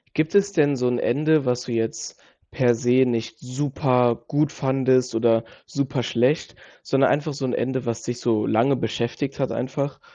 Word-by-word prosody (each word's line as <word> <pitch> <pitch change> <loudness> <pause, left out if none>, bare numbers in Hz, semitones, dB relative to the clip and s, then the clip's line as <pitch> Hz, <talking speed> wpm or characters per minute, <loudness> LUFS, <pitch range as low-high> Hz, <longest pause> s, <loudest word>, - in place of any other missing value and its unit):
Gibt 155 +5 0
es 200 0 +4
denn 145 -6 +2
so 125 -1 0
'n 125 -1 -1
Ende, 155 +3 +2
was 125 0 0
du - - -7
jetzt 115 -1 -3 0.3
per 120 -2 +2
se 125 +2 +3
nicht 115 -2 -3
super 125 -3 0
gut 150 -1 +1
fandest 130 -2 +1
oder 115 0 +2 0.2
super 140 -2 -2
schlecht, 125 +7 0 0.3
sondern 135 0 +2
einfach 150 +1 -1
so 135 -1 -4
'n 125 - -2
Ende, 130 0 -2
was 115 -1 -3
dich 120 0 -4
so 110 -3 +1
lange 120 +6 +2
beschäftigt 120 +4 -3
hat 135 - -1
einfach? 140 +2 -3
130 Hz, 175 wpm, -23 LUFS, 120-140 Hz, 0.3 s, es